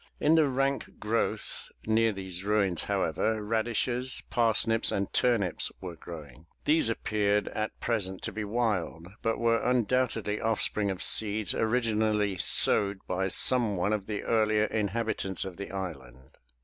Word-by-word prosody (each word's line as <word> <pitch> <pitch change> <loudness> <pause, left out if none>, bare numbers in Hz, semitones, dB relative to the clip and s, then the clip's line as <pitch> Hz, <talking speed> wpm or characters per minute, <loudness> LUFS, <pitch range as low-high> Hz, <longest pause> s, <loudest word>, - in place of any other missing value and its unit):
In 150 - +3
the 160 -2 +4
rank 135 +1 -1
growth 110 +2 -2 0.2
near 110 +1 +3
these 95 -2 -5
ruins 100 -4 +1
however, 100 +3 -1
radishes, 120 +3 0
parsnips 115 -1 +3
and 100 0 -2
turnips 115 -8 +2
were 90 -2 -7
growing. 80 -3 -11 0.2
These 155 -6 +4
appeared 105 -2 0
at 110 0 -4
present 95 -5 -2
to - - -3
be 110 - -4
wild, 100 -7 -2
but 115 - 0
were 115 -1 +2
undoubtedly 120 -3 0
offspring 105 -2 0
of 95 -1 -2
seeds 110 -1 +3
originally 110 -3 +1
sowed 100 +3 +3
by 95 +1 -1
some 115 0 +3
one 100 +4 0
of 100 -2 -3
the 105 -2 -4
earlier 110 -1 +2
inhabitants 105 -3 -2
of 95 -2 -8
the 100 - -6
island. 65 -10 -8
105 Hz, 140 wpm, -28 LUFS, 95-115 Hz, 0.2 s, the